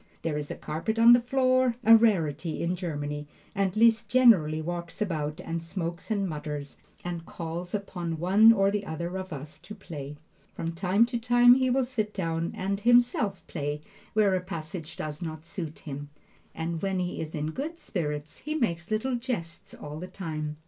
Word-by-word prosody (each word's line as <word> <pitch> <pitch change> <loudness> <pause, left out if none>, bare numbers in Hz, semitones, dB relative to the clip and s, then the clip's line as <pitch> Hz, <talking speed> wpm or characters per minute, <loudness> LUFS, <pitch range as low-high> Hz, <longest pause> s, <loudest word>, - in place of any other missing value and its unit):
There 165 -2 -1
is 150 -1 -4
a - - -4
carpet 165 +9 -3
on 230 +1 +8
the 240 - +6
floor, 255 0 +2
a 225 0 +9
rarity 170 -9 +2
in 175 +2 0
Germany, 150 -4 -4 0.3
and 195 -1 0
Liszt 225 0 +4
generally 195 -12 +5
walks 170 +1 -5
about 155 -7 -2
and 165 0 -4
smokes 170 +1 -5
and 200 -3 0
mutters, 150 -3 -5 0.3
and 175 -2 -4
calls 170 +3 -5
upon 175 -5 -4
one 195 +7 +6
or 195 -3 +3
the 205 0 -1
other 170 +1 -4
of 190 0 -5
us 150 +1 -8
to 180 +6 -10
play. 150 -7 -8 0.4
From 165 - -3
time 185 +6 +3
to 240 0 -3
time 245 +1 +6
he 260 0 +2
will 260 +1 +2
sit 215 -4 -3
down 165 -3 -1
and 195 +1 -2
himself 240 -3 +3
play 145 +1 -3 0.3
where 210 -3 +4
a 185 - +1
passage 165 -3 -7
does 150 +1 -5
not 160 -2 -6
suit 165 -2 -6
him, 145 -1 -7 0.5
and 165 0 -3
when 195 -1 0
he 180 -1 -2
is 160 0 -5
in 155 +1 -2
good 305 - -4
spirits 150 - -4
he 305 +1 -4
makes 175 - -1
little 225 +4 0
jests 230 -10 -5
all 150 +1 -8
the 180 - -6
time. 155 -5 -5
175 Hz, 185 wpm, -28 LUFS, 155-220 Hz, 0.5 s, a